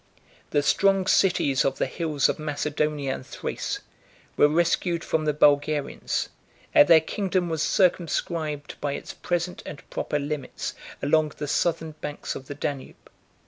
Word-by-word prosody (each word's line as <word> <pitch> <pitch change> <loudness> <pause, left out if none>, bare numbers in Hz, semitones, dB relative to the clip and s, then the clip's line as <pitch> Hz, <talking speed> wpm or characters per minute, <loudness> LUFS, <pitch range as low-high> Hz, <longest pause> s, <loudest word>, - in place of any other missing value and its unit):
The 145 - +1
strong 195 +4 +3
cities 180 -9 +3
of 135 - 0
the - - +1
hills 150 0 0
of - - -2
Macedonia 150 -2 -1
and - - -6
Thrace - - -4 0.5
were - - +6
rescued 170 +2 +1
from 155 -1 0
the 150 - +3
Bulgarians; 145 0 +1 0.4
and 145 - +7
their 165 - +8
kingdom 185 +1 -1
was 160 -2 -1
circumscribed 165 -5 0
by 145 -1 -1
its - - -6
present 175 0 -2
and 145 - -9
proper 150 - -1
limits, 145 0 -4 0.3
along 155 +1 +2
the 150 - -4
southern 165 +1 0
banks 150 -1 -5
of 130 - -9
the 145 - -6
Danube. 140 -1 -6
150 Hz, 145 wpm, -25 LUFS, 145-170 Hz, 0.5 s, their